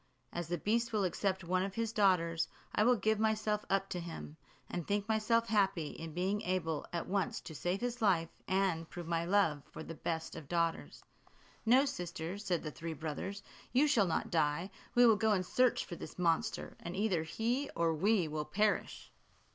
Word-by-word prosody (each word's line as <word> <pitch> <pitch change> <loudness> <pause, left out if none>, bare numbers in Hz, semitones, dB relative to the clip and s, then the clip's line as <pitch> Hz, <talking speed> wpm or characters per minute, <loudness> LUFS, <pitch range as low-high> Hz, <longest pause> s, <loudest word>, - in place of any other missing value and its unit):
As 175 -1 -3
the 175 +1 -1
beast 230 +7 0
will 210 -2 +1
accept 190 +1 0
of 170 - -11
one 185 0 +2
of 195 0 -3
his 230 -1 -1
daughters, 170 -5 +3 0.3
I 210 - +3
will 245 +2 +5
give 220 -1 +1
myself 215 -1 +1
up 195 0 +2
to 180 - -3
him; 165 -3 -7 0.3
and 175 -2 -4
think 205 0 0
myself 225 +1 +2
happy 195 -8 +2
in 165 0 -7
being 190 +4 0
able 170 -4 -1
at 170 - -2
once 195 0 0
to 160 - -9
save 175 +6 -2
his 245 0 -2
life, 175 -6 +3 0.2
and 185 -4 +1
prove 175 -1 -7
my 165 0 0
love 170 -6 +3
for - - -7
the 165 - -7
best 160 0 -3
of 145 - -9
fathers." 170 -1 -1 0.6
"No, 260 +4 +6
sister," 175 - -4
said 180 -5 -1
the 155 - -4
three 165 +2 -5
brothers, 160 +6 -5 0.3
"you 275 +4 +5
shall 230 -10 +4
not 165 - -1
die; 165 +3 +1 0.2
we 245 0 +7
will 225 -3 +6
go 220 0 +3
in 185 -2 +1
search 250 +6 +2
for 175 - -6
this 160 - -9
monster, 180 +5 0
and 170 - -6
either 195 -5 +1
he 235 - -1
or 165 -1 +2
we 190 +2 +2
will 150 0 -3
perish." 205 +7 0
185 Hz, 195 wpm, -34 LUFS, 165-215 Hz, 0.6 s, we